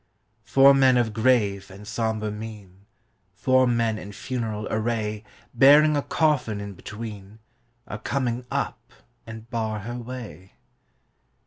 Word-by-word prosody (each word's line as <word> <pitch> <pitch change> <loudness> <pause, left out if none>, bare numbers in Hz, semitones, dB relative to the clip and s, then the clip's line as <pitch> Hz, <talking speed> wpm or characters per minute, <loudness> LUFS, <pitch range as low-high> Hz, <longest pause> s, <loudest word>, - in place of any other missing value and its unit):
Four 135 +1 +6
men 130 -2 +5
of 115 -3 +1
grave 105 -5 +1
and 100 +2 -12
sombre 110 -1 -2
mien, 105 -3 -10 0.5
Four 130 +6 +3
men 115 -2 +1
in 100 - -9
funeral 110 -2 -4
array 110 -1 -2 0.3
Bearing 145 +5 +6
a 145 - +1
coffin 140 -10 0
in 100 0 -6
between, 105 0 -9 0.5
Are 105 - -7
coming 125 0 -2
up - - -2 0.5
and 110 0 -9
bar 110 -2 -2
her 120 +3 -6
way. 115 -8 -9
110 Hz, 125 wpm, -25 LUFS, 105-125 Hz, 0.5 s, Four